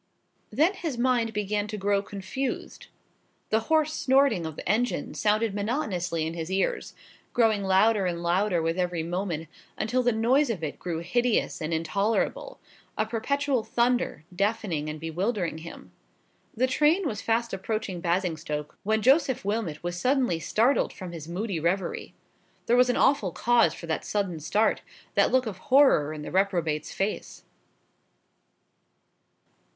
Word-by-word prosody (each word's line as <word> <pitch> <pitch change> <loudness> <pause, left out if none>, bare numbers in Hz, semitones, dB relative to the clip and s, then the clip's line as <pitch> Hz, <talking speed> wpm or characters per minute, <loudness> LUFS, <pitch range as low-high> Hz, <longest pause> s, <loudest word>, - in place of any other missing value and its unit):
Then 310 - +2
his 325 -9 -4
mind 240 -2 +1
began 210 0 -1
to 215 0 -5
grow 200 0 +1
confused. 205 +7 -5 0.6
The 220 - +4
hoarse 310 -1 +3
snorting 265 - +2
of 160 - -7
the - - -8
engine 230 +6 0
sounded 215 0 +1
monotonously 195 - -1
in 160 - -3
his 165 0 -5
ears: 190 +1 -1 0.4
growing 225 -4 +3
louder 195 +1 +3
and 170 -1 -3
louder 175 0 +1
with 165 +2 -1
every 175 -2 -1
moment; 170 -2 -3 0.3
until 245 +4 0
the 245 0 +2
noise 245 +6 +2
of 195 -8 -3
it 150 - -4
grew 165 -2 -3
hideous 240 +5 0
and 155 +1 -3
intolerable—a 215 - -2
perpetual 260 +3 0
thunder, 240 -10 0
deafening 195 -6 -1
and 155 0 -6
bewildering 170 +1 -2
him. 165 +1 -11 0.7
The 255 - +3
train 300 +7 +2
was 210 -6 -3
fast 230 +1 0
approaching 195 -2 -3
Basingstoke, 165 -4 -2
when 220 +1 0
Joseph 265 -4 +3
Wilmot 205 -8 -2
was 175 0 -3
suddenly 250 -9 +2
startled 235 - +2
from 185 -3 -8
his 160 -3 -8
moody 185 +1 -3
reverie. 175 +3 -2 0.5
There 235 - +3
was 250 0 +5
an 245 - +1
awful 245 -10 +3
cause 235 -6 +3
for - - -9
that 160 -1 -2
sudden 195 -6 -2
start, 210 +8 +1 0.3
that - - +3
look 260 0 +3
of 200 -5 -5
horror 265 - +5
in 155 -1 -6
the - - -7
reprobate's 175 -5 0
face. 200 +2 -3
205 Hz, 145 wpm, -27 LUFS, 170-240 Hz, 0.7 s, was